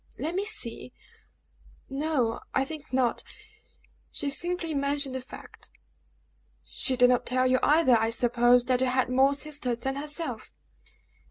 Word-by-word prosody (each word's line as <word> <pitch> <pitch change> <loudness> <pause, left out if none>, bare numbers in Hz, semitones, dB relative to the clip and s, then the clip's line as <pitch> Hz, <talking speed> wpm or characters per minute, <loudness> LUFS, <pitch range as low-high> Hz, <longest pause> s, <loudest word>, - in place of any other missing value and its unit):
"Let 320 +3 -3
me 385 +2 -1
see 255 - -6 0.9
no 270 -5 -1 0.2
I 265 - +2
think 310 +1 -9
not 255 -2 +1 0.9
she 285 -1 -2
simply 345 +1 -1
mentioned 280 -1 -1
the 260 - -4
fact." 255 - -11 1.0
"She 260 -2 -1
did 250 0 +5
not 250 0 +2
tell 255 +1 +1
you 255 0 +3
either, 300 -4 +4
I 225 0 +1
suppose, 240 +1 +3
that 255 0 +1
you 260 - +2
had 255 0 +1
more 270 +2 +4
sisters 280 -5 -3
than 270 +2 -2
herself?" 295 -5 -3
265 Hz, 145 wpm, -27 LUFS, 250-295 Hz, 1.0 s, did